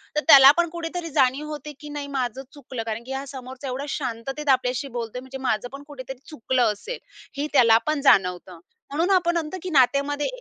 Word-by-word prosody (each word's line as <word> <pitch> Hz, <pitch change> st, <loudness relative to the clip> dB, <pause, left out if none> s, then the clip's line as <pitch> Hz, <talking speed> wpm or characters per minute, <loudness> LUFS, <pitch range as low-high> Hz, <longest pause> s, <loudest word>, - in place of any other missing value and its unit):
तर 300 Hz, -, +2 dB
त्याला 275 Hz, -3 st, +10 dB
पण 345 Hz, -1 st, +2 dB
कुठेतरी 335 Hz, 0 st, -5 dB
जाणीव 270 Hz, +3 st, +2 dB
होते 300 Hz, 0 st, -7 dB
की 295 Hz, -, -10 dB
नाही 290 Hz, -1 st, -5 dB
माझं 265 Hz, -2 st, -3 dB
चुकलं 255 Hz, -5 st, -7 dB
कारण 225 Hz, 0 st, -5 dB
की 260 Hz, -, -10 dB
हा 270 Hz, +1 st, -4 dB
समोरचा 260 Hz, 0 st, -8 dB
एवढा 265 Hz, +3 st, -4 dB
शांततेत 270 Hz, +2 st, -4 dB
आपल्याशी 255 Hz, +1 st, +1 dB
बोलतोय 230 Hz, +1 st, -4 dB
म्हणजे 260 Hz, +1 st, -9 dB
माझं 220 Hz, +2 st, 0 dB
पण 280 Hz, -, -9 dB
कुठेतरी 265 Hz, -2 st, -8 dB
चुकलं 250 Hz, -5 st, +1 dB
असेल -, -, -7 dB, 0.4 s
हे 290 Hz, -, -1 dB
त्याला 230 Hz, -5 st, +6 dB
पण 305 Hz, -2 st, 0 dB
जाणवतं. 180 Hz, -, +2 dB, 0.3 s
म्हणून 325 Hz, +6 st, 0 dB
आपण 345 Hz, -2 st, +3 dB
म्हणतो 325 Hz, +3 st, -3 dB
की 370 Hz, -, -4 dB
नात्यामध्ये 285 Hz, 0 st, +2 dB
270 Hz, 190 wpm, -24 LUFS, 250-300 Hz, 0.4 s, त्याला